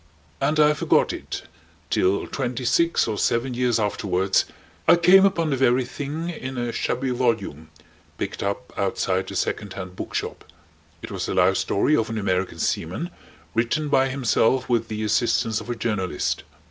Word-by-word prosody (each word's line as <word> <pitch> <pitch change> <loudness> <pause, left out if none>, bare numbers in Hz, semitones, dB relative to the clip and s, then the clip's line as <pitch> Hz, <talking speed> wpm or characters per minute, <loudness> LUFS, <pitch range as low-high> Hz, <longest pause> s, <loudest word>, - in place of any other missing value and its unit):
And 155 0 +1
I 150 0 +6
forgot 150 - +2
it - - -6 0.5
till 95 +2 +2
twenty 125 -2 -3
six 170 +4 +2
or 105 -3 -2
seven 120 +2 +1
years 120 -1 +1
afterwards 95 -2 +1 0.4
I 165 - +8
came 180 +3 +6
upon 165 -5 -1
the - - +2
very 130 -1 +3
thing 145 +6 -4
in 130 -5 -6
a 120 -1 -1
shabby 130 +2 -1
volume 115 - -1 0.5
picked - - -4
up 100 +5 -3
outside 95 -1 -1
a 100 - -7
second 100 +1 -2
hand 90 -1 -7
book - - -6
shop. - - -3 0.6
It - - -7
was - - -3
the - - -2
life - - +4
story 145 +10 +2
of 115 -5 0
an 115 - -3
American 95 -4 -1
seaman - - -2 0.4
written 120 +7 0
by 135 -1 +3
himself 130 -1 +2
with 115 -2 +1
the 110 -1 -4
assistance 110 0 +1
of 110 - -10
a 120 - -1
journalist. 105 -5 -2
120 Hz, 170 wpm, -24 LUFS, 100-135 Hz, 0.6 s, I